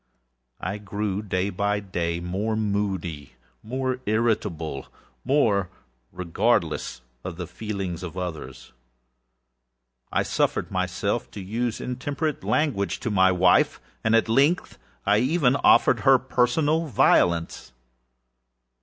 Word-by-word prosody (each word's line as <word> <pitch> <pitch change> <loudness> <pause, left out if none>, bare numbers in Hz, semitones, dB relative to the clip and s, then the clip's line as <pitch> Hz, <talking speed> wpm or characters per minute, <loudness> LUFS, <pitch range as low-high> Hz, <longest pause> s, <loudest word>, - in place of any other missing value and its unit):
I 100 +4 -4
grew, 100 0 -3
day 95 -1 -1
by 100 +2 0
day, 85 -4 -3
more 95 +6 -2
moody, 100 -8 -2 0.3
more 130 +2 -2
irritable, 105 -10 -1 0.4
more 110 -9 +2 0.4
regardless 90 -1 0 0.2
of 90 -2 -5
the 90 - -4
feelings 95 -4 -5
of 90 -1 -7
others. 90 -9 -6 1.4
I - - +1
suffered - - -1
myself - - -1
to - - -9
use 115 +4 -2
intemperate 140 +5 -3
language 140 -10 0
to 120 -4 -2
my 95 -2 +4
wife. 90 0 +3 0.2
At 115 +1 +3
length, 140 +10 +2 0.3
I 105 +1 +4
even 135 0 +2
offered - - +5
her 135 -1 +6
personal 145 +6 +1
violence. 85 - +2
105 Hz, 110 wpm, -25 LUFS, 90-125 Hz, 1.4 s, her